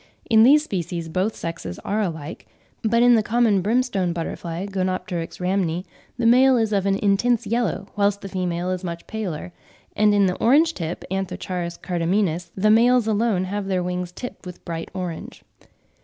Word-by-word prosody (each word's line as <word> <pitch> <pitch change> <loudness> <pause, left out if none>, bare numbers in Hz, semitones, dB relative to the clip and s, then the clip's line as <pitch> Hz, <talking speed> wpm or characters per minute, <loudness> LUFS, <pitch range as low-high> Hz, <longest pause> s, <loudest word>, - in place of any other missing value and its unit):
In 220 -1 +7
these 290 +6 +6
species 175 - -4
both 190 +6 -1
sexes 95 - -6
are 215 +2 0
alike; 160 -5 -5 0.3
but 230 +2 +2
in 245 0 +6
the 225 - +5
common 220 -3 +2
brimstone 205 -4 0
butterfly 170 +1 -4
(Gonepteryx 185 -3 -3
rhamni), 180 -1 -1 0.3
the 240 - -1
male 255 +2 +6
is 220 -2 0
of 200 -1 +1
an 195 - +2
intense 220 +4 +2
yellow, 220 -2 -1
whilst 200 0 +1
the - - -6
female 180 -1 -2
is 185 0 -3
much 170 -1 -5
paler; 180 -6 -5 0.4
and 210 0 +4
in 200 -1 +4
the 180 -1 0
orange 310 +8 +4
tip 170 - -5
(Anthocharis 180 -2 -3
cardamines) 175 -1 -1
the 215 +2 +3
males 240 +1 +5
alone 220 -3 +1
have 195 +1 -3
their 185 -2 0
wings 180 0 -3
tipped 245 +7 -8
with 180 -2 -10
bright 165 -1 -5
orange. 180 -3 -6
195 Hz, 170 wpm, -23 LUFS, 175-220 Hz, 0.4 s, In